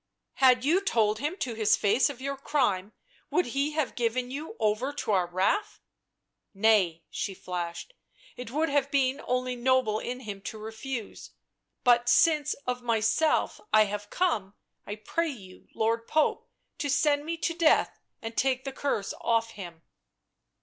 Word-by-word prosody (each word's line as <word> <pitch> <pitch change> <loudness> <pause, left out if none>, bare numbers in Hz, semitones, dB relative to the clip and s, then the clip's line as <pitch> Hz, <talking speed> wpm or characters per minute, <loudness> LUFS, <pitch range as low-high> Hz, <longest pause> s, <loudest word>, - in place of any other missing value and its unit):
" - - -57
Had 250 0 +4
you 345 +7 +3
told 215 - +1
him 300 +7 -2
to 250 - -3
his 215 -1 +3
face 225 +8 +3
of 275 -3 -8
your 275 +1 -3
crime, 220 -9 0 0.4
would 360 - +2
he 275 +5 -1
have 305 -3 -1
given 245 +1 -1
you 285 -2 -6
over 215 +5 +1
to 260 -6 -3
our 185 -3 +2
wrath?" 195 - 0 0.4
" - - -56 0.3
Nay," 195 -6 +3
she 195 - -3
flashed. 175 - -5 0.2
" - - -26
It 250 -2 -7
would 305 +6 0
have 280 -1 +1
been 275 0 +1
only 250 0 0
noble 245 -3 +2
in 250 +3 -5
him 205 -4 -7
to 220 - -6
refuse; 220 +2 -7 0.5
but 240 -1 +4
since 300 +3 +4
of 250 0 -2
myself 230 +6 +1
I 215 - +7
have 205 0 -5
come, 215 - -1 0.3
I 205 - -4
pray 325 +10 -2
you, 195 -9 -11
Lord 230 +1 0
Pope, 310 -1 +1 0.3
to 290 - -2
send 290 +1 +2
me 330 +2 -3
to 335 - -1
death 330 -2 +3 0.2
and 225 0 -5
take 260 -1 +1
the 270 - -5
curse 270 -8 -2
off 230 -1 +1
him." 175 -6 -10
245 Hz, 170 wpm, -28 LUFS, 215-285 Hz, 0.5 s, I